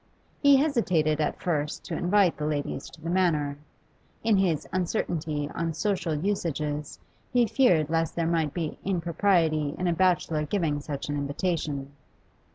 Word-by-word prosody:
He 285 Hz, -1 st, +7 dB
hesitated 180 Hz, -, +2 dB
at 150 Hz, -, -1 dB
first 150 Hz, -4 st, -2 dB
to 170 Hz, -, -4 dB
invite 180 Hz, +1 st, +3 dB
the 150 Hz, -, -3 dB
ladies 145 Hz, -2 st, -3 dB
to -, -, -15 dB
the 165 Hz, +2 st, -5 dB
Manor; 155 Hz, -6 st, +1 dB, 0.6 s
in 220 Hz, -2 st, +4 dB
his 175 Hz, -6 st, +1 dB
uncertainty 165 Hz, -5 st, -1 dB
on 165 Hz, -1 st, -2 dB
social 180 Hz, -3 st, -1 dB
usages 150 Hz, -4 st, -2 dB, 0.3 s
he 245 Hz, -1 st, +4 dB
feared 185 Hz, -, +3 dB
lest 165 Hz, 0 st, 0 dB
there 170 Hz, -, 0 dB
might 165 Hz, -3 st, +1 dB
be 165 Hz, -2 st, -4 dB
impropriety 170 Hz, -4 st, +1 dB
in 180 Hz, -, -1 dB
a 175 Hz, -, +2 dB
bachelor 170 Hz, -3 st, +2 dB
giving 150 Hz, -3 st, 0 dB
such 145 Hz, -1 st, -5 dB
an 145 Hz, -, -2 dB
invitation. 145 Hz, -1 st, -2 dB
165 Hz, 150 wpm, -27 LUFS, 150-185 Hz, 0.6 s, He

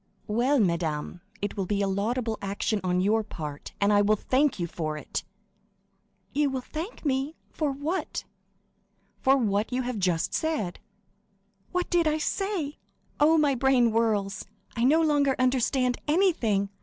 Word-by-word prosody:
"Well, 245 Hz, +6 st, +2 dB
madame, 170 Hz, -3 st, -1 dB, 0.2 s
it 205 Hz, -, -2 dB
will 195 Hz, -2 st, -2 dB
be 205 Hz, 0 st, 0 dB
a -, -, +1 dB
laudable 220 Hz, +4 st, -1 dB
action 200 Hz, +1 st, -1 dB
on 180 Hz, 0 st, +1 dB
your 215 Hz, +3 st, +2 dB
part, 150 Hz, -8 st, -7 dB
and 205 Hz, +1 st, +3 dB
I 205 Hz, -, +5 dB
will 210 Hz, +1 st, +4 dB
thank 260 Hz, +6 st, +1 dB
you 175 Hz, -, -1 dB
for 155 Hz, -2 st, -4 dB
it!" -, -, -4 dB, 1.1 s
"You 290 Hz, 0 st, +2 dB
will 265 Hz, -1 st, -3 dB
thank 325 Hz, -, -7 dB
me—for 285 Hz, +2 st, -2 dB
what?" 295 Hz, +7 st, -3 dB, 1.0 s
"For 270 Hz, +1 st, +4 dB
what 210 Hz, -3 st, 0 dB
you 255 Hz, +1 st, 0 dB
have 245 Hz, -3 st, -3 dB
just 180 Hz, -3 st, 0 dB
said." 300 Hz, -, -1 dB, 0.9 s
"What 360 Hz, 0 st, 0 dB
did 345 Hz, -2 st, +3 dB
I 310 Hz, 0 st, +2 dB
say? 350 Hz, -3 st, -2 dB, 0.4 s
Oh, 315 Hz, +2 st, +5 dB
my 295 Hz, -3 st, +3 dB
brain 255 Hz, -2 st, +3 dB
whirls; 215 Hz, -3 st, 0 dB, 0.3 s
I 235 Hz, 0 st, +1 dB
no 310 Hz, +5 st, +5 dB
longer 290 Hz, -3 st, +3 dB
understand 255 Hz, 0 st, +1 dB
anything. 295 Hz, -, +2 dB
245 Hz, 150 wpm, -27 LUFS, 200-290 Hz, 1.1 s, I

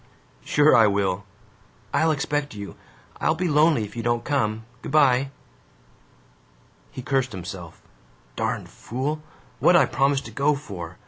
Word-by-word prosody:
"Sure 150 Hz, -, +4 dB
I 110 Hz, -, +6 dB
will!" 100 Hz, -1 st, 0 dB, 0.7 s
"I'll 160 Hz, -, +3 dB
expect 145 Hz, -3 st, -1 dB
you. 100 Hz, -1 st, -7 dB, 0.4 s
I'll 160 Hz, -, +2 dB
be 180 Hz, +2 st, -1 dB
lonely 150 Hz, -5 st, +4 dB
if 105 Hz, -, -8 dB
you 115 Hz, -, -3 dB
don't 120 Hz, 0 st, 0 dB
come! 110 Hz, -6 st, -1 dB, 0.2 s
Good -, -, -7 dB
by." 135 Hz, -3 st, +4 dB, 1.6 s
He 130 Hz, -, -8 dB
cursed 130 Hz, -2 st, 0 dB
himself: 90 Hz, -2 st, -8 dB, 0.5 s
"Darned -, -, -2 dB
fool, 140 Hz, +6 st, -4 dB, 0.4 s
what -, -, +5 dB
'd -, -, +7 dB
I -, -, +5 dB
promise 135 Hz, 0 st, +1 dB
to 115 Hz, -, -10 dB
go 140 Hz, +6 st, +2 dB
for? 90 Hz, -, -8 dB
130 Hz, 145 wpm, -24 LUFS, 105-145 Hz, 1.6 s, d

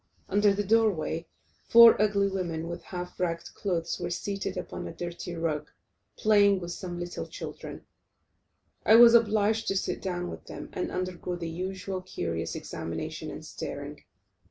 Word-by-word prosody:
Under 205 Hz, +1 st, +4 dB
the 200 Hz, +1 st, 0 dB
door 225 Hz, +2 st, +4 dB
way, 165 Hz, -2 st, -3 dB, 0.4 s
four 230 Hz, -2 st, +9 dB
ugly 200 Hz, -1 st, +3 dB
women 170 Hz, -4 st, -3 dB
with 170 Hz, +1 st, -5 dB
half 180 Hz, 0 st, -7 dB
ragged 170 Hz, -2 st, -2 dB
clothes, 170 Hz, -4 st, -2 dB
were 175 Hz, -, -3 dB
seated 200 Hz, +3 st, -3 dB
upon -, -, -5 dB
a -, -, -6 dB
dirty 175 Hz, 0 st, -6 dB
rug, 165 Hz, -3 st, -2 dB, 0.5 s
playing 205 Hz, -2 st, +4 dB
with 175 Hz, -1 st, -6 dB
some 175 Hz, -1 st, -5 dB
little 175 Hz, 0 st, -5 dB
children. -, -, -8 dB, 1.0 s
I 220 Hz, -, +6 dB
was 235 Hz, 0 st, +9 dB
obliged 220 Hz, -1 st, +3 dB
to 195 Hz, -, +1 dB
sit -, -, -2 dB
down 180 Hz, -2 st, -3 dB
with -, -, -9 dB
them, -, -, -8 dB
and 365 Hz, -3 st, -2 dB
undergo 180 Hz, -1 st, -3 dB
the 170 Hz, -1 st, -5 dB
usual 185 Hz, +2 st, -4 dB
curious 85 Hz, -, -3 dB
examination -, -, -5 dB
and -, -, -8 dB
staring. -, -, -7 dB
185 Hz, 155 wpm, -28 LUFS, 175-205 Hz, 1.0 s, four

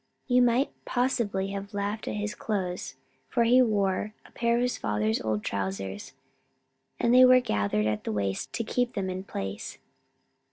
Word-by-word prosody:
You 250 Hz, -1 st, +4 dB
might 245 Hz, +3 st, +3 dB
possibly 235 Hz, -6 st, 0 dB
have 200 Hz, +1 st, -6 dB
laughed 205 Hz, +2 st, -3 dB
at -, -, -2 dB
his 210 Hz, 0 st, -2 dB
clothes, 185 Hz, -5 st, -3 dB, 0.3 s
for 235 Hz, -, +2 dB
he 245 Hz, +2 st, +6 dB
wore 210 Hz, -2 st, +1 dB
a -, -, -17 dB
pair 235 Hz, 0 st, +1 dB
of 240 Hz, -, +1 dB
his 250 Hz, -, 0 dB
father's 105 Hz, +1 st, 0 dB
old 110 Hz, -1 st, -1 dB
trousers, 95 Hz, +2 st, -4 dB, 0.9 s
and 235 Hz, -, +3 dB
they 255 Hz, +1 st, +8 dB
were 255 Hz, 0 st, +8 dB
gathered 105 Hz, -, 0 dB
in 110 Hz, -, +2 dB
at 105 Hz, -, -4 dB
the -, -, -3 dB
waist 100 Hz, -2 st, -2 dB
to 230 Hz, -, -1 dB
keep 245 Hz, +2 st, -1 dB
them 190 Hz, -2 st, -2 dB
in 185 Hz, +1 st, -5 dB
place. 100 Hz, -, -5 dB
200 Hz, 175 wpm, -28 LUFS, -, 0.9 s, they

